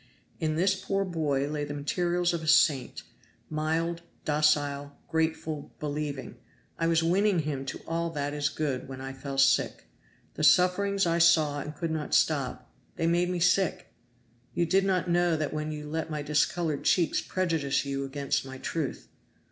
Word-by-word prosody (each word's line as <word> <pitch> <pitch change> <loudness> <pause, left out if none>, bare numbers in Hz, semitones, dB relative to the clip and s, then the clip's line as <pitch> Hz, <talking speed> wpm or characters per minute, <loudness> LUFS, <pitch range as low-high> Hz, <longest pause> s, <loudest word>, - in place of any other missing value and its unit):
In 155 -2 0
this 190 +4 +3
poor 195 +1 -1
boy 150 -6 0
lay 150 0 -3
the 145 0 -5
materials 175 +4 0
of 170 - -2
a 160 - -6
saint 150 -5 +3 0.5
mild, 165 +2 -1 0.2
docile, 145 -1 +1
grateful, 160 -2 -2
believing. 145 -2 -4 0.4
I 165 - +1
was 165 -1 +3
winning 190 +3 +3
him 140 -3 -4
to - - -5
all 170 +1 -1
that 145 -2 -3
is 145 0 0
good 145 -5 -3
when 130 -1 -8
I 135 0 -6
fell 135 +1 -6
sick. 135 0 +3 0.5
The 155 - -4
sufferings 185 +6 +4
I 170 0 +1
saw 155 -4 +4
and 150 +2 -6
could 165 +1 -3
not 155 -2 -1
stop - - 0 0.2
they 165 - -1
made 175 +1 +2
me 180 -1 -1
sick. 180 +1 +1 0.6
You 175 - +2
did 190 +3 +2
not 185 -2 +1
know 175 -1 +2
that 155 -1 -2
when 155 0 -3
you 150 -1 -6
let 160 +1 -3
my 150 -2 -3
discolored 150 +1 0
cheeks 175 -3 +2
prejudice 165 -7 0
you 140 0 -2
against 140 0 -1
my 130 0 -8
truth. 150 +1 -4
155 Hz, 170 wpm, -28 LUFS, 145-170 Hz, 0.6 s, sufferings